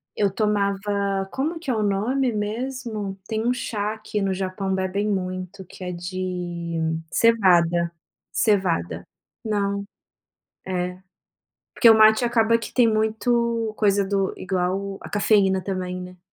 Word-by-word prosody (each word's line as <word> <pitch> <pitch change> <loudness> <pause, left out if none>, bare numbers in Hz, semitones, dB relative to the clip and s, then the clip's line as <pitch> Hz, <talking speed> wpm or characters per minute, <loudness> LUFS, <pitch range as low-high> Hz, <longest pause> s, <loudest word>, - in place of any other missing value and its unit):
Eu 205 -1 +2
tomava 200 -1 0
como 320 +5 -2
que 275 -6 -3
é - - +1
o 215 - 0
nome 230 +6 +1
mesmo? 215 -2 -4
Tem 220 0 -2
um - - +4
chá 215 -3 -2
que 215 -1 -3
no 195 - 0
Japão 190 +1 -2
bebem 190 +2 -1
muito, 185 0 -4
que 185 - -11
é 180 - -3
de 175 -1 -4 0.3
cevada. 175 -7 +4 0.4
Cevada. 175 - +1 0.4
Não. 200 -2 -1 0.8
É. 180 -1 -2 0.8
Porque 235 - +6
o 220 - +7
mate 220 +2 +6
acaba 230 -1 +3
que 230 - -8
tem 245 -2 +5
muito 225 +1 +1
coisa 200 -1 +3
do 195 0 0
igual 185 0 -1
o 195 0 -5
a - - -8
cafeína 195 -3 +3
também, 185 -1 -3
né. 180 0 -10
200 Hz, 140 wpm, -23 LUFS, 185-220 Hz, 0.8 s, o